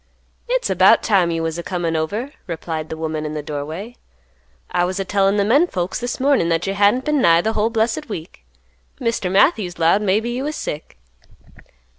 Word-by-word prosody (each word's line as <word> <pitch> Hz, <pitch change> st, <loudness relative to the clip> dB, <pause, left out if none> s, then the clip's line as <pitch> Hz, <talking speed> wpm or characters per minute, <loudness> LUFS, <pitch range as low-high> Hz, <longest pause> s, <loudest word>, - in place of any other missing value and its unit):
"It's -, -, +1 dB
about -, -, +5 dB
time 190 Hz, -5 st, +3 dB
you 165 Hz, -1 st, -2 dB
was 165 Hz, +1 st, -3 dB
a -, -, -2 dB
comin' 170 Hz, -2 st, -2 dB
over," 205 Hz, -, -2 dB, 0.2 s
replied 160 Hz, -2 st, -4 dB
the 160 Hz, -, -5 dB
woman 155 Hz, -1 st, -3 dB
in 155 Hz, 0 st, -4 dB
the 150 Hz, -, -4 dB
doorway; 155 Hz, +10 st, -6 dB, 0.7 s
"I 175 Hz, -1 st, +1 dB
was 185 Hz, +2 st, -2 dB
a 195 Hz, -, -2 dB
tellin' 195 Hz, +1 st, +2 dB
the 200 Hz, -, +2 dB
menfolks 225 Hz, -, +1 dB
this 245 Hz, 0 st, -4 dB
mornin' 265 Hz, -10 st, +2 dB
that 165 Hz, +1 st, 0 dB
you 195 Hz, -, -1 dB
hadn't 205 Hz, +6 st, +2 dB
been 300 Hz, -2 st, +1 dB
nigh 170 Hz, -4 st, +5 dB
the 220 Hz, +4 st, -1 dB
whole 215 Hz, +1 st, +1 dB
blessed 230 Hz, +5 st, -1 dB
week. 170 Hz, -4 st, -8 dB, 0.6 s
Mr. 230 Hz, -7 st, -1 dB
Matthews 195 Hz, -, +2 dB
'lowed 170 Hz, +5 st, +3 dB
maybe 210 Hz, +4 st, +1 dB
you 250 Hz, +2 st, -3 dB
was 300 Hz, +1 st, -3 dB
sick." 150 Hz, -, -6 dB
195 Hz, 190 wpm, -20 LUFS, 165-230 Hz, 0.7 s, about